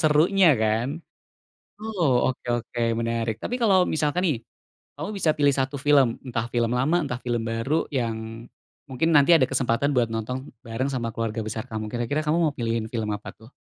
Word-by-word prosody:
serunya 165 +5 +4
kan. 110 +3 +1 0.9
Oh 185 -11 0 0.2
oke - - -15 0.2
oke 120 - -8 0.2
menarik 115 -1 -1
tapi 245 - -2
kalo 220 -4 +4 0.2
misalkan 155 +3 0
nih, 145 - +1 0.6
kamu - - -5
bisa 165 -4 +3
pilih 145 -1 +4
1 135 +2 -1
film 140 -4 +6 0.2
entah 115 -2 -2
film 120 -1 +1
lama 150 +7 +2
entah 125 -3 -4
film 120 -2 -1
baru 115 +6 -1 0.2
yang, 115 -2 -1 0.7
mungkin 135 +5 0
nanti 145 +4 +5
ada 135 - +4
kesempatan 135 +1 +1
buat 120 -2 +3
nonton 125 +4 -4 0.2
bareng 120 +4 -2
sama 120 -3 -2
keluarga 115 0 -2
besar 110 0 -4
kamu 110 -1 -3
kira-kira 120 +5 -1
kamu 155 +3 +2
mau 150 - +1
pilihin 115 -1 -1
film 110 -3 -2
apa - - -11
tuh? 110 +4 -17
125 Hz, 175 wpm, -25 LUFS, 115-150 Hz, 0.9 s, film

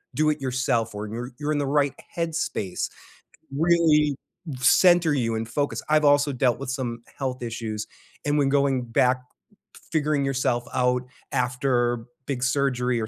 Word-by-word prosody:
do 155 0 +3
it 150 -1 -1
yourself 125 -3 0
or 105 +1 -4
you're 120 +4 -6
you're 150 0 -1
in 150 - +1
the 145 - 0
right 140 -1 +2 0.2
headspace, 160 - -2 0.7
really 155 -2 +3 0.4
center 175 +3 +5
you 115 -5 0
in 110 - -1
focus. 140 +5 -2
I've 155 0 +4
also 145 0 +4
dealt 125 -1 +2
with 140 - -5
some 120 -3 -4
health 130 -2 -3
issues. 110 -2 -4 0.4
And 145 0 +1
when 140 - +3
going 140 -2 +2
back 125 +2 +2 0.7
figuring 150 -3 +1
yourself 130 -3 0
out 125 0 +2 0.3
after 125 -2 0 0.2
big 130 -3 -2
surgery 125 -2 +1
or 110 - -2
130 Hz, 150 wpm, -25 LUFS, 120-145 Hz, 0.7 s, center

